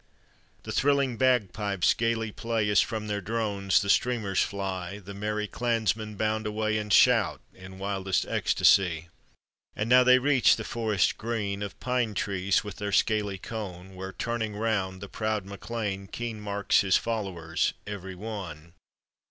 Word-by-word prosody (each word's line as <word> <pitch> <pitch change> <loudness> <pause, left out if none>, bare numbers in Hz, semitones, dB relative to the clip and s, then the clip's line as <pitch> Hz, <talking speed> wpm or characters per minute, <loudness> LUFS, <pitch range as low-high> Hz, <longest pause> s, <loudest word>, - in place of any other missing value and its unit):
The - - -6
thrilling 140 -3 +2
bagpipes 105 -6 +2
gayly 115 -1 -1
play 115 -1 -1
As 100 - +5
from 110 -1 -3
their 105 -1 -2
drones 100 -1 0
the - - -5
streamers 110 -5 +1
fly, 95 -1 -3
The 100 -1 -10
merry 105 +1 -2
clansmen 110 -1 -1
bound 110 +1 -1
away 110 0 0
And 105 0 -5
shout 100 - +5
in 95 0 -12
wildest 95 -1 -1
ecstacy. 85 -3 +3 0.7
And 105 - -2
now 125 +1 +7
they 125 0 +7
reach 135 -1 +4
the 110 - -5
forest 110 -5 0
green 105 -3 -2
Of 100 -1 -6
pine 125 -4 -1
trees 95 -1 0
with 105 -4 -8
their 105 -1 -3
scaly 105 -2 +1
cone, 95 -4 -7
Where 95 +1 -6
turning 115 -3 -3
round 100 -4 -1
the 100 - -6
proud 110 -1 -2
MacLean 100 -1 -4
Keen 115 0 -5
marks 100 -1 +2
his 95 -2 +3
followers 95 -8 -2
every 95 -2 -6
one. 90 -6 -7
105 Hz, 150 wpm, -27 LUFS, 95-115 Hz, 0.7 s, now